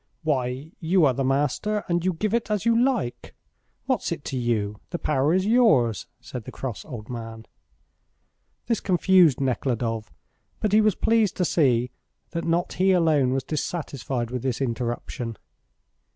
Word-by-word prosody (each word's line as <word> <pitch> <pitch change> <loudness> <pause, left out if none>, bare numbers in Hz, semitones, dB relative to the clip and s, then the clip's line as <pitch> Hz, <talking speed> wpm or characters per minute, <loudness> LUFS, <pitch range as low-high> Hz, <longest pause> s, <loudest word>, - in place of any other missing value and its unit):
"Why, 135 0 -1
you 175 0 +3
are 135 - +3
the 135 - -1
master, 145 +11 0
and 175 -1 0
you 185 0 +1
give 210 +6 -2
it 235 -1 0
as 210 0 -1
you 230 0 +4
like. 125 - -2 0.5
What's - - -1
it - - -4
to - - -4
you? 110 -4 -1
The 175 - -3
power 145 -2 +1
is 185 +2 +2
yours," 205 - +3
said 120 -4 -8
the - - -7
cross 125 -5 -5
old 115 -7 -8
man. 115 -2 -7 1.2
This 230 -3 0
confused 180 -6 +4
Nekhludoff, 120 -4 -1 0.5
but 210 - 0
he 215 - +6
was 215 -3 +3
pleased 225 -3 +2
to 180 - +1
see 125 -7 +2 0.4
that 170 -1 -3
not 170 +1 0
he 190 +1 +3
alone 155 -7 +3
was 135 0 0
dissatisfied 140 -6 -3
with 125 -1 -3
this 130 -2 -2
interruption. 120 -2 -3
140 Hz, 160 wpm, -25 LUFS, 120-185 Hz, 1.2 s, he